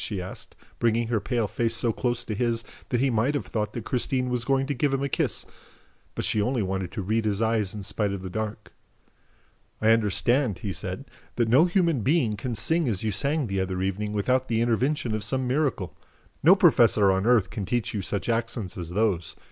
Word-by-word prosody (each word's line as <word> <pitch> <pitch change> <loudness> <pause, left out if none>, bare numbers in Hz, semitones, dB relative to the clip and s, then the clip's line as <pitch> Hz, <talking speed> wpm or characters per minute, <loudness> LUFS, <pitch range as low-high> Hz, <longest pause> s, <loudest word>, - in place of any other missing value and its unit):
she 105 -4 -3
asked, 90 +1 -8 0.2
bringing 115 0 +1
her 115 -3 +1
pale 115 +1 -1
face 115 +2 -1
so 115 -1 +2
close 120 +1 -1
to 110 - -3
his 115 +1 0 0.3
that 120 - +1
he 135 -1 +2
might 120 +6 +1
have 145 - -2
thought 105 -2 -3
that 120 -2 -6
Christine 125 0 -1
was 120 -1 -1
going 135 0 +2
to 145 - -2
give 135 +1 +1
him 135 - -2
a - - +1
kiss; - - -1 0.7
but - - -2
she 105 - +1
only 120 +1 0
wanted 95 -1 -3
to 100 - -3
read 110 +4 0
his 105 -2 0
eyes 110 -3 0
in 105 - -6
spite 100 +1 -1
of 100 -1 -5
the 95 - -5
dark. 110 +1 -5 1.1
"I 110 - +2
understand," 115 +1 +2
he 100 -4 -4
said, - - -4 0.3
"that 120 -2 +1
no 135 +8 +6
human 170 - +1
being 130 -4 +2
can 120 +3 -4
sing 160 - +1
as 100 -3 -2
you 110 - 0
sang 140 +8 0
the 95 -3 -2
other 95 0 -2
evening 100 +2 -2
without 125 +5 +1
the 115 -1 0
intervention 120 +2 0
of 110 -1 -1
some 130 +4 -1
miracle. 130 - -1 0.5
No 175 +6 +7
professor 120 - +5
on 95 +3 0
earth 115 -6 +3
can 105 -4 -4
teach 120 +1 -1
you 105 - -2
such 100 +1 -3
accents 115 -5 -2
as 85 -2 -6
those. 90 -3 0
115 Hz, 215 wpm, -26 LUFS, 105-125 Hz, 1.1 s, No